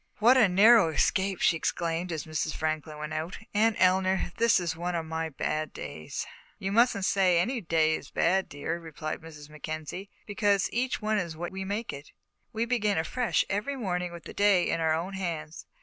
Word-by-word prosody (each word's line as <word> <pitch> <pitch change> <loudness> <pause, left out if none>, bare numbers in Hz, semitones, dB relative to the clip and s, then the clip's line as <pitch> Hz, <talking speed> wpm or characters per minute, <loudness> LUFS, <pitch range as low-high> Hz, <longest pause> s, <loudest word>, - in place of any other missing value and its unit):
"What 235 +4 +6
a 225 -6 +5
narrow 205 0 +6
escape!" 190 +4 +1
she - - +4
exclaimed, 170 +2 -2
as 160 -2 -3
Mrs. 155 0 -2
Franklin 155 -1 -3
went 150 +1 -5
out. 160 +3 -4 0.2
"Aunt 215 +1 +3
Eleanor, 185 -1 +2
this 230 -3 +4
is 170 -2 -2
one 175 +1 -3
of 165 -1 -2
my 160 0 -3
bad 155 +1 -3
days." 75 0 -6 0.3
"You 195 0 -3
mustn't 225 -3 +3
say 185 -3 +3
any 235 +8 0
day 160 -3 +2
is 145 - -5
bad, 190 +3 +1
dear," 160 +4 -4
replied 155 -1 -6
Mrs. 155 -2 -11
Mackenzie, 155 +5 -6 0.2
"because 205 -2 +1
each 250 -1 -1
one 215 0 +1
is 170 -4 -4
what 175 +1 -4
we 190 0 -5
make 205 +4 -3
it. 140 +1 -10 0.4
We 230 0 -1
begin 215 -4 +1
afresh 230 +10 0
every 210 +8 -2
morning 180 -7 -2
with 170 -1 -10
the - - -9
day 200 -3 +3
in - - 0
our 160 -1 +2
own 175 +4 -4
hands. 165 -5 -5
180 Hz, 195 wpm, -28 LUFS, 160-205 Hz, 0.4 s, What